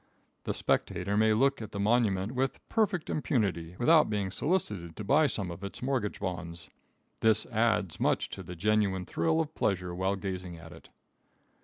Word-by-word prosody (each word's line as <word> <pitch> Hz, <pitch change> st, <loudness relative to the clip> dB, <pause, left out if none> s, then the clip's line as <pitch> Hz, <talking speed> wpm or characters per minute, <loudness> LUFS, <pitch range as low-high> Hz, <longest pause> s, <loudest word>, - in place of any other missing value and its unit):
The -, -, -2 dB
spectator 95 Hz, +3 st, 0 dB
may 110 Hz, +1 st, +4 dB
look 135 Hz, +4 st, +2 dB
at 110 Hz, -1 st, -8 dB
the 100 Hz, -, -4 dB
monument 105 Hz, -2 st, +2 dB
with 130 Hz, +1 st, -1 dB
perfect 205 Hz, -7 st, +1 dB
impunity, 95 Hz, -, -1 dB
without 155 Hz, -, +5 dB
being 100 Hz, -3 st, -1 dB
solicited 105 Hz, -, -1 dB
to -, -, -6 dB
buy 145 Hz, +8 st, +4 dB
some 100 Hz, -8 st, -2 dB
of 85 Hz, +3 st, -9 dB
its 100 Hz, +4 st, -7 dB
mortgage 125 Hz, -6 st, -1 dB
bonds. 85 Hz, -5 st, -5 dB, 0.5 s
This 110 Hz, -1 st, +4 dB
adds 110 Hz, -6 st, 0 dB
much -, -, +1 dB
to -, -, -6 dB
the 90 Hz, 0 st, -8 dB
genuine 100 Hz, 0 st, +1 dB
thrill 160 Hz, -, +1 dB
of 160 Hz, -1 st, -2 dB
pleasure 90 Hz, -, -1 dB
while 95 Hz, +2 st, 0 dB
gazing 95 Hz, -3 st, -5 dB
at 80 Hz, 0 st, -12 dB
it. 80 Hz, -, -14 dB
100 Hz, 170 wpm, -30 LUFS, 90-125 Hz, 0.5 s, without